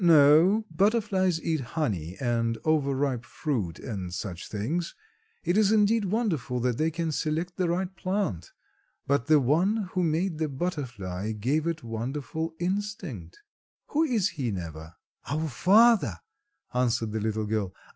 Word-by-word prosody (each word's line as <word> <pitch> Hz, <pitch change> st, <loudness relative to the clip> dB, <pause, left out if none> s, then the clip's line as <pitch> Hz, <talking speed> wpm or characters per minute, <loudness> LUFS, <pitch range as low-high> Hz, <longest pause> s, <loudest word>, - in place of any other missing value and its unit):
"No, 165 Hz, +6 st, +6 dB
butterflies 190 Hz, -2 st, +2 dB
eat 160 Hz, -1 st, 0 dB
honey 105 Hz, -, -3 dB
and 115 Hz, -2 st, 0 dB
overripe 140 Hz, -5 st, +1 dB
fruit 115 Hz, -, -3 dB
and 95 Hz, -6 st, -5 dB
such 90 Hz, 0 st, -5 dB
things; 150 Hz, -, -2 dB, 0.5 s
it 175 Hz, -, +1 dB
is 210 Hz, -1 st, +4 dB
indeed 215 Hz, 0 st, +3 dB
wonderful 180 Hz, -, -1 dB
that 125 Hz, -1 st, 0 dB
they 160 Hz, +1 st, +2 dB
can 165 Hz, 0 st, -2 dB
select 160 Hz, +4 st, -2 dB
the 180 Hz, -3 st, 0 dB
right 185 Hz, +2 st, -1 dB
plant, 185 Hz, -, -2 dB, 0.5 s
but 140 Hz, -3 st, +1 dB
the 155 Hz, -1 st, +6 dB
One 180 Hz, -, +1 dB
who 185 Hz, -, 0 dB
made 165 Hz, 0 st, 0 dB
the 155 Hz, -2 st, 0 dB
butterfly 120 Hz, -, -3 dB
gave 135 Hz, +10 st, 0 dB
it 165 Hz, -4 st, -2 dB
wonderful 140 Hz, +8 st, -4 dB
instinct. 180 Hz, -, -4 dB, 0.5 s
Who 305 Hz, -, +1 dB
is 235 Hz, -, +2 dB
He, 140 Hz, -8 st, -3 dB
Neva?" 85 Hz, -4 st, -6 dB, 0.3 s
"Our 155 Hz, +3 st, -1 dB
Father," 190 Hz, -, +4 dB, 0.6 s
answered 120 Hz, -3 st, +1 dB
the 110 Hz, -, -2 dB
little 110 Hz, 0 st, -1 dB
girl. 105 Hz, -3 st, -1 dB
150 Hz, 140 wpm, -27 LUFS, 115-180 Hz, 0.6 s, No